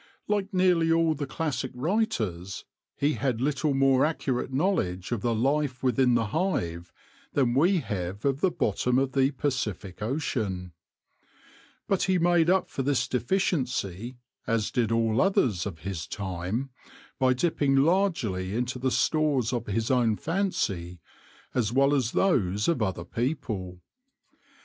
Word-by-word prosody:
Like 205 -1 0
nearly 180 -3 +3
all 165 -1 +3
the 145 -2 -4
classic 140 -3 -2
writers, 120 - -2 0.3
he 145 +2 +2
had 130 -6 -1
little 140 +2 0
more 135 -1 +4
accurate 135 -5 -1
knowledge 130 - 0
of 120 -4 -1
the 115 +1 0
life 135 +2 0
within 125 -1 +3
the 115 -1 +2
hive 85 - -1 0.4
than 130 -4 +2
we 170 +7 +3
have 100 -2 -4
of 140 +1 +1
the 190 - +4
bottom 125 - 0
of 135 0 +1
the 135 0 +3
Pacific 120 -10 -3
Ocean. 105 - -2 1.2
But 195 - +1
he 190 -1 +2
made 175 -1 +3
up 190 +1 +3
for - - -4
this 135 0 +1
deficiency, 125 - -1 0.3
as 115 -3 0
did 115 -3 0
all 115 +1 +2
others 115 - +2
of 85 -5 -8
his 85 -2 -5
time, 95 +8 -4 0.5
by 130 -1 +4
dipping 145 -2 +1
largely 135 - +1
into 125 +2 -2
the 130 +1 +1
stores 140 -5 +1
of 120 -2 -3
his 110 +3 -1
own 120 -4 +3
fancy 100 - -2 0.5
as 115 -4 0
well 140 +3 +3
as 130 -5 0
those 105 - +2
of 165 -8 +1
other 95 -5 -2
people. 110 - -3
130 Hz, 145 wpm, -27 LUFS, 105-150 Hz, 1.2 s, more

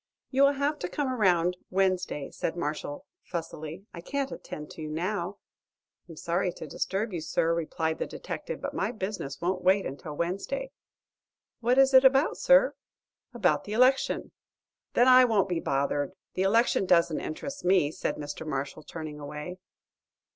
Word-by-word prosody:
"You 270 0 +2
will 280 0 +6
have 285 +2 -1
to 180 - -3
come 285 -3 -1
around 180 -6 +2
Wednesday," 185 -6 0
said 165 - -3
Marshall, 150 -3 -4 0.2
fussily. 165 +1 -6
"I 170 - -8
can't 275 +8 -2
attend 150 0 -8
to - - -9
you 155 - -5
now." 180 +4 -2 0.7
"I'm 165 - -9
sorry 175 +3 -1
to 160 - -8
disturb 195 +7 -2
you, 170 - -3
sir," 165 +1 +1
replied 160 -1 -2
the - - -2
detective, - - -6
"but - - -4
my - - -1
business 190 - -5
won't 180 +1 -1
wait 190 +1 +4
until 145 +2 -6
Wednesday." 350 - -2 0.9
"What 245 +2 +2
is 270 0 +5
it 260 0 +8
about, 270 +3 +4
sir?" - - +5 0.6
"About 180 -10 +2
the 205 - -5
election." 255 +4 +3 0.6
"Then 245 - +5
I 255 0 +9
won't 220 -6 +3
be 175 -3 -1
bothered. 140 +3 -1 0.2
The 185 - -2
election 195 0 +3
doesn't 170 -3 +3
interest 275 - -6
me," 180 -5 +3
said 150 - -2
Mr. 145 +1 -6
Marshall, 140 0 -4
turning 155 0 -7
away. 150 +5 -7
180 Hz, 160 wpm, -28 LUFS, 155-240 Hz, 0.9 s, I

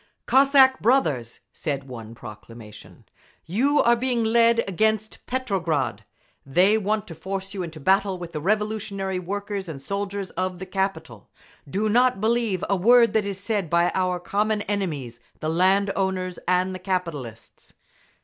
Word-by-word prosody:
Cossack 270 -1 +5
brothers! 155 - +1
(said 140 -3 -3
one 115 -3 -9
proclamation). 110 0 -12 0.4
You 265 - +2
are 235 0 +5
being 240 -1 0
led 230 0 +3
against 215 +3 -1
Petrograd. 190 - -1 0.4
They 180 +10 +3
want 215 0 0
to 165 - -8
force 190 +3 -5
you 195 - -4
into 165 -3 -7
battle 190 +4 +2
with 175 -1 -8
the 155 -3 -5
revolutionary 200 -1 -1
workers 200 0 -4
and 150 -4 -6
soldiers 200 +4 -4
of 185 -1 -3
the 190 - -7
capital. 180 - -4 0.4
Do 205 +7 0
not 245 +1 +3
believe 220 -3 0
a 200 - +2
word 230 +4 +5
that 220 -2 +2
is 200 -1 -4
said 200 -4 -2
by 170 +1 +3
our 185 -1 0
common 210 +3 -1
enemies, 150 - -3 0.2
the 155 - -2
land 190 +4 +3
owners 185 -2 -2
and 180 +1 +1
the 185 - -6
capitalists. 165 - -5
195 Hz, 150 wpm, -24 LUFS, 170-215 Hz, 0.4 s, Cossack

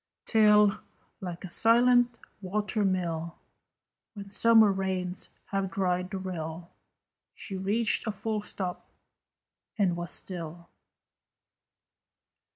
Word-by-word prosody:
Till, 210 -2 +5 0.4
like 180 0 -6
a - - -8
silent 240 +2 +4 0.2
water 205 +2 -1
mill, 170 -3 -1 0.8
When 200 -1 -9
summer 220 -2 +5
suns 185 -1 -3 0.2
have 195 -1 -1
dried 180 -1 -1
the 195 - -4
rill, 170 -2 -6 0.6
She 195 - -6
reached 210 +5 0
a - - +1
full 215 0 -3
stop, 185 -3 -5 0.9
and 190 -5 +2
was 175 0 -5
still. 170 -2 -6
190 Hz, 100 wpm, -28 LUFS, 180-210 Hz, 0.9 s, Till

